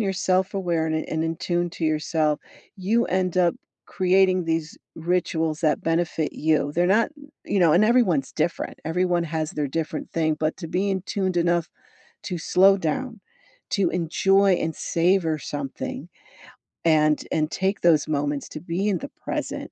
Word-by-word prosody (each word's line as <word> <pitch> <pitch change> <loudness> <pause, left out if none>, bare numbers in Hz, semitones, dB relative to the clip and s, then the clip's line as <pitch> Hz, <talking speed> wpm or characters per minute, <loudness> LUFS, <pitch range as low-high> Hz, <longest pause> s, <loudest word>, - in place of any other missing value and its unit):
you're 195 -3 0
self-aware 185 -3 0
and 160 0 0
i - - +1
and 160 0 -1
in 165 0 -2
tune 175 +1 -1
to 165 - -5
yourself, 155 -1 0 0.4
you 220 +6 +1
end 185 -1 -1
up 175 -2 +3 0.3
creating 185 -1 +2
these 165 -1 -2 0.2
rituals 165 -2 -1
that 155 -2 +1
benefit 165 -1 0
you. 155 -2 +1
They're 175 +1 +2
not 215 +8 +3 0.3
you 200 - 0
know, 165 -3 +5
and 185 +6 +5
everyone's 210 - +2
different, 165 +2 -2
everyone 175 +1 +1
has 160 -1 -3
their 145 -2 -2
different 160 +1 -4
thing, 155 -2 0
but 155 +1 -1
to 170 - -6
be 195 +4 0
in 190 -1 -1
tuned 190 -2 -2
enough 170 -1 +1 0.6
to 180 -3 -3
slow 195 +4 +4
down, 225 - -3 0.5
to 190 -4 +1
enjoy 195 +3 +3
and 160 -2 -2
savor 170 -2 +1
something, 145 -1 -5 0.8
and 155 -2 +3
and 155 0 0
take 190 +4 -1
those 160 -4 +4
moments 145 -1 -1
to 155 - -8
be 180 +4 -2
in 190 -4 0
the - - -7
present, - - -4
170 Hz, 165 wpm, -24 LUFS, 155-185 Hz, 0.8 s, know